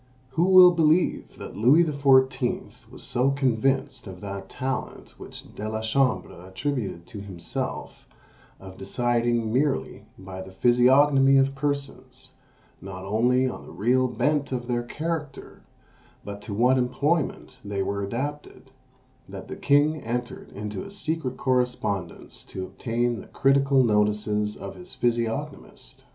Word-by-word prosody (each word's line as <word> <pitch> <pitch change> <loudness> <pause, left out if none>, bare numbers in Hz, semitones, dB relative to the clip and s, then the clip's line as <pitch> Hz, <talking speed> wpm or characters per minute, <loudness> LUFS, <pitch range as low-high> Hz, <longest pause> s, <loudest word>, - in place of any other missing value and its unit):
Who 165 +6 +2
will 185 -1 +8
believe 165 0 +1
that - - -9
Louis 130 +11 +5
XIV. 135 -4 +1
was - - -11
so 125 +2 +1
convinced 135 -1 0
of 95 -2 -9
that 100 -1 -7
talent 130 0 -4
which - - -11
De 105 +1 -5
la 110 0 -3
Chambre 120 -5 0
attributed 110 -3 -4
to 105 - -9
himself, 100 +8 -6 0.5
of 95 -1 -12
deciding 120 +2 0
merely 140 +2 -1
by 95 0 -8
the 95 - -9
physiognomy 135 +5 +5
of 135 0 +3
persons, 140 0 -4 0.5
not 95 -1 -8
only 125 +6 +2
on 125 - -7
the - - -11
real 130 +4 +2
bent 140 +4 0
of 125 -2 -3
their 120 -1 -1
character, 150 +3 -5 0.6
but 100 0 -7
to 105 - -7
what 125 +4 +3
employment 135 +1 -1
they 100 -1 -2
were 100 +1 -2
adapted, 135 +4 -5 0.6
that 95 0 -9
the - - -5
king 145 +2 +3
entered 120 +1 -4
into 105 - -5
a 200 - -9
secret 160 -9 -4
correspondence 125 -6 -2
to 95 - -6
obtain 120 +2 -2
the - - -14
critical 135 -1 +3
notices 105 -1 +1
of 100 - -7
his 180 0 -12
_physiognomist? 120 - -3
125 Hz, 135 wpm, -25 LUFS, 105-140 Hz, 0.6 s, will